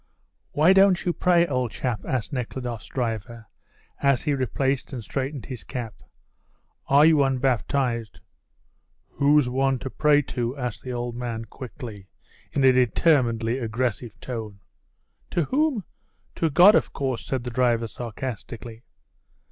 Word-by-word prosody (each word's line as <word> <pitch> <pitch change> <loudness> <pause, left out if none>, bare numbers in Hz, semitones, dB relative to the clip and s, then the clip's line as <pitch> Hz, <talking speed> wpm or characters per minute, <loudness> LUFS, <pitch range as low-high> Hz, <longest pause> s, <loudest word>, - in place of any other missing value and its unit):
"Why 160 +6 +5
don't 190 -2 +4
you 175 - +1
pray, 175 -1 +3
old 125 -6 -1
chap?" 115 -2 -3
asked 130 +2 -2
Nekhludoff's 125 -2 -4
driver 115 -2 -4 0.6
as 140 -3 +2
he 150 - +1
replaced 135 0 -1
and 125 -4 -6
straightened 135 +1 -4
his 130 -4 -7
cap. 120 -5 -5 0.9
"Are 140 +2 +6
you 155 -3 +5
unbaptized?" 130 -3 0 0.9
"Who's 145 -1 +3
one 135 +1 +1
to 130 +1 -6
pray 150 -1 +3
to?" 125 +1 -3
asked 125 -4 -4
the 130 - -6
old 120 -1 -3
man 120 -2 -4
quickly, 115 -6 -9 0.4
in 140 - 0
a 130 - +7
determinately 125 -2 +2
aggressive 115 -1 -3
tone. 110 -5 -6 0.7
"To 170 - 0
whom? 275 - 0 0.5
To 165 - 0
God, 180 +8 +7
of - - +1
course," 130 -4 -2
said 130 -3 -3
the 125 - -5
driver 120 -1 +2
sarcastically. 115 0 -7
125 Hz, 135 wpm, -25 LUFS, 115-140 Hz, 0.9 s, a